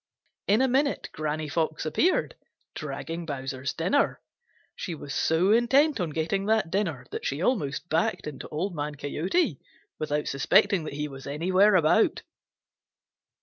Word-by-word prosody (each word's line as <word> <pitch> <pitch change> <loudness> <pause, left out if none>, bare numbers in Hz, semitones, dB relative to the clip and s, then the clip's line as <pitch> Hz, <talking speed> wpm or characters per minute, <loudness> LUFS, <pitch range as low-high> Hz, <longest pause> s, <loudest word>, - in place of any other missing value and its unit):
In 215 +6 +4
a - - +4
minute 275 +3 +1
Granny 155 0 -3
Fox 160 +1 -1
appeared, 335 - +1 0.4
dragging 155 +3 -5
Bowser's 135 -3 -4
dinner. 185 - +1 0.6
She 175 - -5
was 140 -2 -7
so 165 +8 +2
intent 265 +5 +4
on 175 -3 -1
getting 165 +6 -1
that 215 -6 +2
dinner 165 -11 -1
that - - -5
she 140 - -2
almost 160 - -1
backed 165 0 0
into 150 -3 -7
Old 175 +6 -3
Man 150 -1 -4
Coyote 155 - -1 0.4
without 150 -1 -1
suspecting 155 +6 +3
that 150 - -5
he 150 +1 -2
was 135 -1 -10
anywhere 185 +8 +3
about. 160 -3 +3
160 Hz, 145 wpm, -27 LUFS, 145-195 Hz, 0.6 s, In